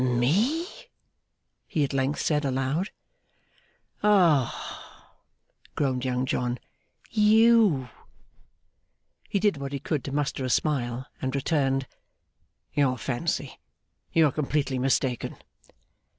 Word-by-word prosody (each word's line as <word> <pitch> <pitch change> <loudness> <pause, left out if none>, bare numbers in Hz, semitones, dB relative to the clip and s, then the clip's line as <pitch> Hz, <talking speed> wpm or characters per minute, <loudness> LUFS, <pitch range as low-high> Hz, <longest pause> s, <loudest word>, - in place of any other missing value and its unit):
'Me!' 170 - +2 1.0
he 155 - 0
at 140 - -2
length 135 +2 0
said 150 -1 +1
aloud. 135 +7 -1 1.1
'Ah!' 175 - +1 0.6
groaned 130 -3 0
Young 130 0 0
John. 125 -1 -1 0.5
'You!' 215 - +5 1.4
He - - 0
did 200 -5 +2
what 140 0 -5
he 140 - -2
could 145 -1 -2
to 140 - -4
muster 140 -1 -1
a 130 - -2
smile, 125 -3 0 0.2
and 130 +1 -2
returned, 135 -2 +1 0.9
'Your 140 -3 +2
fancy. 135 +3 -3 0.5
You 165 -1 +5
are 145 - +3
completely 140 -2 -1
mistaken. 130 -1 0
140 Hz, 105 wpm, -26 LUFS, 130-160 Hz, 1.4 s, You